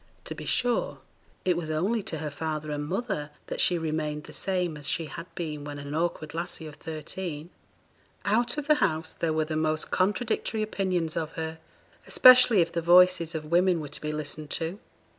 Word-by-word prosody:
To - - -4
be - - -8
sure, 245 - +1 0.5
it 180 -2 +3
was 165 -2 -4
only 190 +9 0
to 165 - -4
her 150 -1 -4
father 155 0 -4
and 145 0 -3
mother 190 -5 -2 0.2
that - - -3
she 175 - +4
remained 155 -2 -2
the - - -11
same 180 -4 -1
as 150 0 -3
she 165 - 0
had 155 +3 -8
been 155 -4 -4
when 145 0 -6
an 140 0 -6
awkward 160 -2 -2
lassie 170 -1 -4
of 155 - -8
thirteen. 160 +1 -6 0.7
Out 235 +6 +2
of 295 - -2
the 305 - +5
house 160 -3 0
there 165 - -1
were 155 0 +1
the 155 0 -4
most 155 0 0
contradictory 215 +3 0
opinions 185 -6 -1
of 160 -2 -3
her, 160 0 -5 0.5
especially 255 -5 +8
if 165 0 0
the 170 - -1
voices 175 -1 +5
of 155 -1 -4
women 175 0 +4
were 150 -2 -6
to 145 - -6
be 150 - -2
listened 150 0 -4
to. 165 +4 -2
165 Hz, 195 wpm, -27 LUFS, 155-185 Hz, 0.7 s, especially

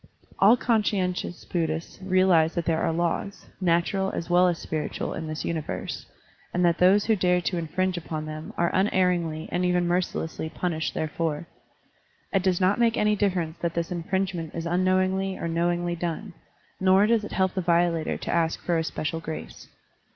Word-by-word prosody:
All 215 +5 +7
conscientious 200 -7 0
Buddhists 165 +1 -3
realize 185 -4 +3
that 170 -2 -1
there 160 0 +1
are - - +1
laws, 170 +4 -2 0.2
natural 185 +2 +1
as 170 +1 -4
well 180 +1 +5
as 175 -2 +1
spiritual, 155 -1 -3
in 160 - -5
this 155 0 -4
universe, 160 -3 -4 0.5
and 180 0 +3
that 170 -1 +2
those 190 +3 +5
who 220 - +3
dare 180 -2 +2
to 175 0 -1
infringe 180 +3 -1
upon 155 -2 -5
them 155 0 -7
are 170 0 +1
unerringly 180 -5 +1
and 180 - 0
even 180 -1 +2
mercilessly 175 -2 -1
punished 160 -2 -2
therefor. 155 0 -2 0.9
It 195 - +3
does 185 -1 +1
not 190 +4 +2
make 230 -1 +3
any 210 0 +3
differ 195 -3 +1
ence 160 0 -7
that 170 -1 -2
this 170 0 -2
infringement 175 -1 -2
is 165 0 -4
unknowingly 185 +2 +1
or - - -3
knowingly 175 +1 0
done, 175 +3 -4 0.5
nor 190 +2 +5
does 225 0 +2
it 210 - -7
help 190 -1 +1
the 190 - -1
violator 170 -1 +1
to - - -4
ask 165 -1 +1
for 170 -2 0
a - - 0
special 160 0 -3
grace. 155 - -7
175 Hz, 175 wpm, -26 LUFS, 165-185 Hz, 0.9 s, All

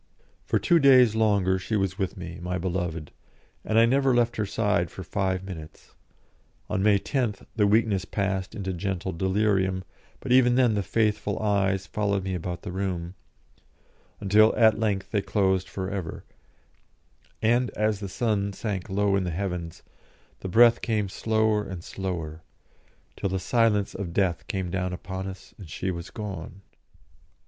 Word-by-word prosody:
For - - +1
two 170 -2 +3
days 130 -5 +6
longer 100 -4 +2
she 110 +4 -3
was 95 -1 -1
with 95 +1 -2
me, 85 -2 -7
my 90 +1 -2
beloved, 85 -3 -3 0.5
and 110 - 0
I 115 - +7
never 135 +1 +3
left 120 -1 +2
her 105 -2 -1
side 105 -5 0
for 95 - -8
five 95 0 -1
minutes. 80 -5 -10 0.8
On 95 - 0
May 100 0 +5
10th 115 -2 -2
the 105 -3 +3
weakness 105 -2 +2
passed 95 -2 -2
into 95 -3 -3
gentle 95 +1 -3
delirium, 95 +1 +1 0.4
but - - -5
even 125 -1 +5
then 125 -3 +4
the 105 - 0
faithful 105 +1 0
eyes 100 -2 +1
followed 100 0 -1
me 95 0 -3
about 90 0 -4
the 95 - -5
room, 90 -2 -3 1.1
until 105 +2 +4
at 110 -3 +4
length 100 -3 -1
they 105 - +1
closed 95 -2 +1
for 95 0 -4
ever, 95 -5 -5 1.2
and 120 +3 +2
as 105 -1 +1
the 100 -2 -5
sun 100 -2 -1
sank 100 -4 -4
low 100 +1 +1
in 95 - +1
the 90 - -2
heavens, 85 -2 -4 0.6
the 95 - -5
breath 120 +4 +6
came 105 -4 -1
slower 110 +1 +1
and 95 -4 -7
slower, 85 -6 -5 0.7
till 100 - -2
the 95 - -1
silence 105 0 +1
of 90 -4 -5
Death 95 -3 0
came 95 -3 -3
down 90 -1 -2
upon 95 +1 -5
us 95 0 -10
and 95 -6 -10
she 95 +5 -3
was 85 -1 -6
gone. 100 -3 -7
100 Hz, 160 wpm, -26 LUFS, 95-110 Hz, 1.2 s, I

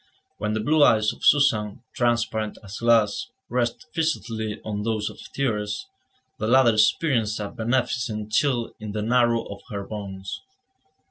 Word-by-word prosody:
When 105 0 -1
the 110 - 0
blue 150 +7 +3
eyes 110 -5 +4
of - - -16
Suzanne, 115 -7 +3
transparent 115 -3 0
as 100 +1 -8
glass, 115 -3 +3 0.2
rested 120 -1 -1
fixedly 115 - -2
on 105 -1 -3
those 110 -1 -1
of - - -15 0.2
Thérèse, 115 - -1 0.5
the 110 - -1
latter 120 -1 +5
experienced 110 0 +2
a 105 -1 -3
beneficent 115 -2 -1
chill 120 -1 +1
in 105 -1 -6
the 105 -1 -2
marrow 120 0 +3
of 100 - -9
her 100 -2 -4
bones. 100 -2 -6
110 Hz, 145 wpm, -24 LUFS, 105-120 Hz, 0.5 s, latter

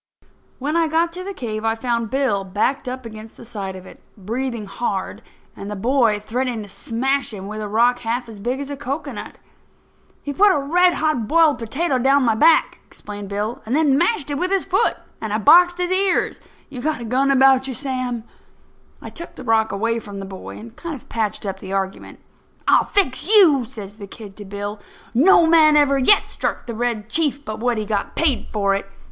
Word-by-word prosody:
When 290 +4 -2
I 335 -1 +3
got 330 +2 +1
to 365 +1 -6
the 395 - -5
cave 225 - -5
I 225 0 +1
found 235 -1 -2
Bill 260 -7 0
backed 250 +8 -1
up 255 0 -6
against 220 0 -10
the - - -12
side 200 -4 -6
of 185 0 -10
it, - - -14 0.2
breathing 230 +3 -4
hard, 195 -1 -4 0.3
and 200 - -8
the 210 - -4
boy 230 0 +2
threatening 235 +1 -3
to 205 - -12
smash 265 +8 -1
him 195 -3 -7
with 215 +2 -6
a 210 - -4
rock 240 +4 +2
half 240 +1 -3
as 220 -3 -11
big 245 +6 -2
as 280 0 -6
a - - -3
cocoanut. 275 -3 -6 0.9
"He 285 - -4
put 405 +6 +5
a - - +1
red 350 +6 +3
hot 305 -8 0
boiled 320 -2 +4
potato 265 +5 -1
down 270 +2 +3
my 230 -2 +3
back," 315 +8 +3
explained 205 -1 -9
Bill, 210 +3 -3
"and 235 +5 -2
then 295 -3 +3
mashed 345 -2 +1
it 285 - -2
with 365 +2 0
his 390 -1 0
foot; - - +2 0.3
and 220 - -4
I 215 - +1
boxed 350 +9 +6
his 360 0 -1
ears. 380 0 +2
Have - - -26 0.2
you 255 -3 -6
got 305 -1 -2
a - - -5
gun 260 +4 +1
about 265 -1 +5
you, 260 - -4
Sam?" 255 -4 -3 0.8
I - - -8
took 340 - -9
the - - -9
rock 220 -1 +2
away 230 +3 -1
from 205 -2 -9
the 195 - -6
boy 190 -1 -9
and 230 +1 -11
kind 335 -3 -6
of 260 - -14
patched 215 -2 -2
up 190 -1 -4
the 190 0 -7
argument. 195 0 -4 0.5
"I'll - - +5
fix 285 -8 +1
you," 335 - +6
says 210 -4 -10
the 200 -2 -9
kid 200 0 -11
to 205 - -9
Bill. 205 +1 -6 0.3
"No 330 +7 +6
man 320 -2 +5
ever 280 -2 +3
yet 330 +10 +5
struck - - -3
the 235 - -5
Red 225 -2 -2
Chief 285 +2 -1
but 215 0 -5
what 240 0 0
he 215 - -2
got 205 -1 -3
paid 300 -7 +1
for 200 -2 +1
it. 195 0 -3
245 Hz, 215 wpm, -21 LUFS, 215-285 Hz, 0.9 s, boxed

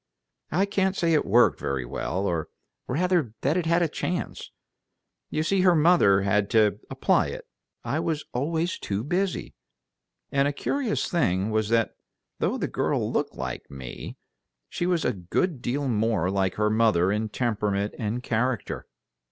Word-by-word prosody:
"I 185 +6 +3
can't 195 -1 0
say 170 -3 +2
it 150 - +2
worked 120 +5 +4
very 70 -3 -2
well, 95 +10 -3
or 85 -5 -1 0.4
rather 165 - +1
that 140 +4 +1
it 175 -3 0
had 170 +1 +3
a - - +2
chance. 175 +3 -4 0.8
You 155 - -1
see, 195 +3 +2
her 180 -2 +5
mother 155 - +5
had 100 +1 +1
to 105 -2 +4
apply - - +2
it; - - -7 0.4
I 145 - -1
was 160 -2 -2
always 160 +7 -1
too 100 +2 -3
busy. 180 +6 -1 0.8
And 140 0 +3
a 145 - -1
curious 250 - -1
thing 100 - +1
was 110 -1 0
that 115 -1 +2 0.5
though - - 0
the - - -1
girl - - -1
looked - - -1
like 65 -2 -5
me, 65 -3 -8 0.5
she 175 - -2
was 175 -3 +1
a 125 - +2
good 120 - -1
deal 140 +4 -1
more 110 -6 +1
like 95 -2 0
her 105 0 +1
mother 110 -5 +3
in 110 +1 -1
temperament 105 -3 -1
and 115 +3 -2
character." 120 0 -1
120 Hz, 160 wpm, -26 LUFS, 100-165 Hz, 0.8 s, her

